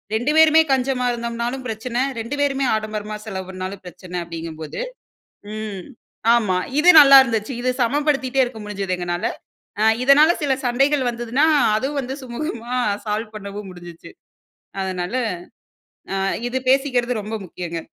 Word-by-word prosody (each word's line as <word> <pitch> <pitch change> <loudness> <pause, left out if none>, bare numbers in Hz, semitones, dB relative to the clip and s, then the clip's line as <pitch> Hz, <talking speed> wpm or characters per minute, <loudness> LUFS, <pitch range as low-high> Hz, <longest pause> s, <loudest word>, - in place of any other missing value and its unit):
2 240 +7 0
பேருமே 320 0 +7
கஞ்சமா 260 -1 +1
இருந்தோம்னாலும் 235 +2 -3
பிரச்சன, 235 +3 -2 0.2
2 230 +5 -4
பேருமே 275 -1 +1
ஆடம்பரமா 215 -1 -4
செலவு 190 -4 -5
பண்னாலும் 185 +1 -6
பிரச்சன 180 0 -7
அப்டிங்கும்போது 160 -2 -7 0.7
ம். 210 -4 -5 0.5
ஆமா. 205 -6 +1 0.2
இது 340 +4 +5
நல்லா 275 -1 +9
இருந்துச்சி. 225 0 -2
இது 255 - 0
சமப்படுத்திட்டே 270 0 0
இருக்க 240 -3 -5
முடிஞ்சிது 195 -3 -3
எங்கனால. 175 0 -3 0.6
அ - - +3 0.2
இதனால் 295 +6 +5
சில 285 -3 +1
சண்டைகள் 270 +3 +2
வந்ததுனா, 240 +4 0 0.3
அதுவும் 275 +6 -1
வந்து 260 0 -5
சுமூகமா 240 -1 -5 0.3
சால்வ் 215 +1 -3
பண்ணவும் 200 0 -7
முடிஞ்சுச்சு. 175 -1 -12 0.7
அதனால 185 +1 -3 1.0
அ - - -1 0.3
இது 250 +2 -2
பேசிக்கற்து 255 -2 +2
ரொம்ப 215 +2 -5
முக்கியங்க. 170 -1 -6
235 Hz, 130 wpm, -21 LUFS, 195-265 Hz, 1.0 s, நல்லா